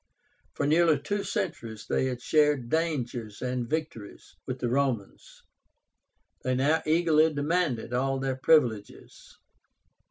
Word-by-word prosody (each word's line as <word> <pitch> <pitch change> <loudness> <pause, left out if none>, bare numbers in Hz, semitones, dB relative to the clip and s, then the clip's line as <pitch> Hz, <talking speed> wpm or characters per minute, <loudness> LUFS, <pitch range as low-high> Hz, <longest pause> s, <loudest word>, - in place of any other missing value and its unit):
For 145 - -1
nearly 160 0 +4
two 200 +8 -3
centuries 175 - -4
they - - 0
had 125 -2 -4
shared 150 -6 +2
dangers 125 -10 -2
and 125 -2 -2
victories 155 -10 -5
with 130 - -3
the 125 - -2
Romans; 125 -5 -2 1.0
they 130 0 0
now 145 +5 +2
eagerly 160 -1 +3
demanded 145 -5 -1
all 135 +2 0
their 135 -1 -2
privileges. 125 -7 0
135 Hz, 120 wpm, -27 LUFS, 125-160 Hz, 1.0 s, nearly